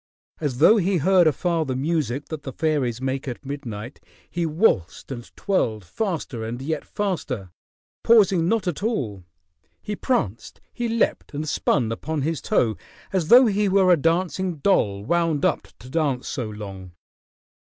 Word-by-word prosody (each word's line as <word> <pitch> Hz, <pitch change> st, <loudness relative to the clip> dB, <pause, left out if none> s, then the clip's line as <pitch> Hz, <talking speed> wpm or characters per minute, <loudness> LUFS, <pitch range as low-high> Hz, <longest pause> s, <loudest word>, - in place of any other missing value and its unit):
As 145 Hz, -6 st, -2 dB
though 220 Hz, -, +6 dB
he 190 Hz, -1 st, +2 dB
heard 180 Hz, +2 st, +4 dB
afar 165 Hz, +2 st, +1 dB
the 130 Hz, -4 st, -3 dB
music 145 Hz, -1 st, -1 dB
that 155 Hz, -2 st, -5 dB
the 135 Hz, -, -6 dB
fairies 135 Hz, -5 st, 0 dB
make 135 Hz, +1 st, -3 dB
at 125 Hz, +2 st, -6 dB
midnight, 125 Hz, -4 st, -6 dB, 0.3 s
he 170 Hz, -1 st, -2 dB
waltzed 150 Hz, -, +1 dB
and 120 Hz, -3 st, -5 dB
twirled 110 Hz, -, -1 dB
faster 150 Hz, -, -3 dB
and 115 Hz, +2 st, -4 dB
yet 155 Hz, +4 st, -3 dB
faster, 145 Hz, -, -3 dB, 0.5 s
pausing 195 Hz, -7 st, +5 dB
not 220 Hz, -3 st, +1 dB
at 175 Hz, -1 st, -2 dB
all. 125 Hz, -, -2 dB, 0.6 s
He 210 Hz, -1 st, -5 dB
pranced, 120 Hz, -, -2 dB
he 240 Hz, -1 st, -2 dB
leaped 230 Hz, -9 st, -1 dB
and 155 Hz, +2 st, -3 dB
spun 125 Hz, -5 st, +1 dB
upon 145 Hz, +5 st, -3 dB
his 160 Hz, -1 st, -1 dB
toe 110 Hz, -3 st, +1 dB, 0.4 s
as 180 Hz, -5 st, 0 dB
though 250 Hz, +6 st, +8 dB
he 205 Hz, -2 st, +2 dB
were 190 Hz, -1 st, +4 dB
a -, -, +6 dB
dancing 175 Hz, +3 st, 0 dB
doll 110 Hz, -, +1 dB
wound 165 Hz, -1 st, +1 dB
up -, -, 0 dB
to 120 Hz, -, -13 dB
dance 135 Hz, -3 st, -1 dB
so 120 Hz, -6 st, -3 dB
long. 95 Hz, -4 st, -8 dB
155 Hz, 160 wpm, -23 LUFS, 125-185 Hz, 0.6 s, though